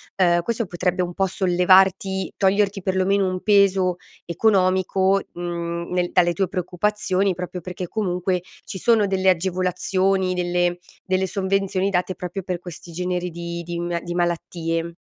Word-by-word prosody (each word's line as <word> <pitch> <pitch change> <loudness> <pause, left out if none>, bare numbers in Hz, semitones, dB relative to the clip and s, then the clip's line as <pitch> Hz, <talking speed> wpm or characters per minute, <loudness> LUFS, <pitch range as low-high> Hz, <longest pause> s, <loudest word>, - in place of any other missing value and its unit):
ehm, 175 -2 +3
questo 230 +4 -2
potrebbe 180 +1 -1
un 175 0 -5
po' 195 +2 +1
sollevarti, 190 +1 +3
toglierti 200 +1 +2
perlomeno 190 +1 +1
un 185 0 -3
peso 195 -3 +3 0.3
economico, 190 +1 +2
mhmm, 170 -1 -4
nel 180 -1 0
dalle 175 -2 +4
tue 195 +1 0
preoccupazioni 190 +1 0
proprio 180 +1 -6
perché 180 +1 -6
comunque 180 -3 -1 0.2
ci - - -6
sono 225 +1 +3
delle 190 -1 +2
agevolazioni, 185 +1 +1
delle 175 0 0 0.3
delle 190 0 0
sovvenzioni 195 0 0
date 185 -1 -1
proprio 180 +2 -5
per 180 -1 -3
questi 175 -1 -10
generi 180 +1 -2
di 170 0 -5
di 170 0 -5
m 175 0 -2
di 175 - -5
malattie. 170 -1 -2
185 Hz, 145 wpm, -22 LUFS, 175-195 Hz, 0.3 s, dalle